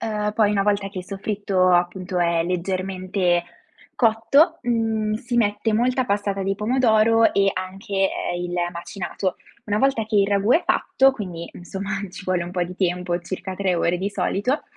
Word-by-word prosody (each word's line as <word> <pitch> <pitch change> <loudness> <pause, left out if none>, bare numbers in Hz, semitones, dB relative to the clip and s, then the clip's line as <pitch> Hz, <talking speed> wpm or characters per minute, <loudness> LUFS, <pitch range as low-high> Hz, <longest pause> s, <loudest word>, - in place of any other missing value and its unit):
uhm, 210 -2 -2
poi 210 -1 +3
una 200 -1 +1
volta 200 -1 0
che 195 -1 -8
il 180 - -6
soffritto 195 -2 0
appunto 180 +1 0
è 170 -1 +2
leggermente 185 0 -1 0.6
cotto, 275 +9 +3
mhmm, 225 -2 0
si 240 +2 -3
mette 210 0 +1
molta 250 +3 +2
passata 200 -2 -1
di 195 +1 0
pomodoro 225 0 +3
e 195 0 +3
anche, 185 +2 -6 0.4
ehm, 175 - -3
il 175 0 -4 0.2
macinato. 185 +2 -4 0.3
Una 210 0 0
volta 265 -4 +2
che 220 - -5
il 200 - +4
ragù 200 +3 +2
è 335 - +4
fatto, 270 0 +3
quindi 180 -9 -7
insomma 195 +3 -6 0.2
ci 190 - -10
vuole 180 -2 0
un 175 - -8
po' 180 -1 0
di 180 +1 -5
tempo, 180 -1 0
circa 185 +1 -6
3 190 -2 0
ore 170 +1 +1
di 195 - -1
solito, 205 +7 -1
200 Hz, 175 wpm, -23 LUFS, 185-220 Hz, 0.6 s, il